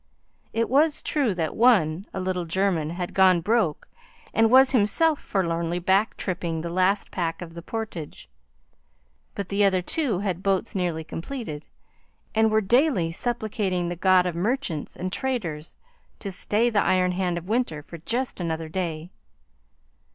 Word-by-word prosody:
It 230 0 0
was 295 +4 +2
true 265 -10 0
that 160 -3 -2
one, 195 -7 +3
a - - -4
little 185 -1 -2
German, 170 -2 0
had 175 +1 -4
gone 185 -2 +5
broke 205 -4 0 0.5
and 225 0 +4
was 260 +2 +7
himself 280 +7 +2
forlornly 170 -3 -1
back 190 +4 +1
tripping 170 -3 -3
the 170 +1 -5
last 185 +3 +1
pack 165 -3 -2
of 170 -2 -8
the 170 - -8
portage; 175 - -6 1.1
but 200 -2 -4
the 200 +1 +2
other 190 -2 +3
two 270 - 0
had 185 -2 -2
boats 195 +3 0
nearly 175 -5 -1
completed, 165 - -6 0.7
and 220 0 +3
were 220 0 +3
daily 235 - +2
supplicating 205 -4 -2
the 175 - -3
god 185 +1 +4
of 180 - -1
merchants 195 - -2
and 185 +1 -4
traders 175 -13 -3 0.4
to 200 - -6
stay 220 +5 +1
the 205 -2 +3
iron 185 -1 +2
hand 180 -1 -1
of 170 +1 -7
winter 215 -10 -1
for 170 +2 -10
just 245 +9 -3
another 160 -2 -3
day. 170 -1 -4
185 Hz, 155 wpm, -25 LUFS, 170-220 Hz, 1.1 s, was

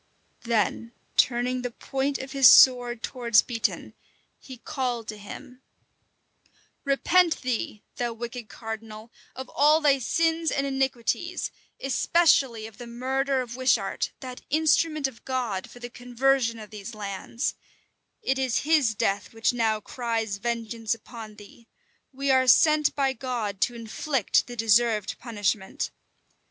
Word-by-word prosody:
Then 230 +1 0 0.2
turning 250 +1 +2
the 245 - -3
point 270 +3 -2
of 265 +1 -8
his 270 -2 +6
sword 245 -2 +6
towards 235 -4 +3
Beatoun, 230 -2 -3 0.5
he 260 -2 -11
called 250 -5 -3
to 215 - -5
him, 250 +5 -11 1.2
"Repent 330 +4 +2
thee, 235 -4 -3
thou 240 -1 -1
wicked 235 0 -7
cardinal, 220 0 -8 0.2
of 260 0 -7
all 300 +2 +4
thy 285 -3 +3
sins 325 +5 +1
and 275 - -1
iniquities, 270 +6 -1 0.3
especially 270 -4 +2
of 220 0 -12
the 240 - -8
murder 265 +3 -1
of 240 -1 -7
Wishart, 245 -6 0
that 255 -2 -8
instrument 310 -1 +2
of 240 -4 -13
God 245 -8 -3
for - - -14
the 240 0 -7
conversion 245 0 0
of 215 -2 -11
these 215 +1 -8
lands: 205 +4 -3 0.7
it 265 0 0
is 260 -3 0
his 295 -8 +3
death 200 +1 -1
which 225 +2 +1
now 220 -3 +1
cries 225 -2 -3
vengeance 230 0 -2
upon 225 -1 -11
thee: 210 +3 -16 0.4
we 275 0 -1
are 260 -1 +4
sent 305 +4 +5
by 270 -2 +1
God 225 -6 -4
to 240 - +1
inflict 230 +2 0
the 245 - -8
deserved 225 -2 +2
punishment. 205 -4 -2
245 Hz, 135 wpm, -26 LUFS, 225-270 Hz, 1.2 s, his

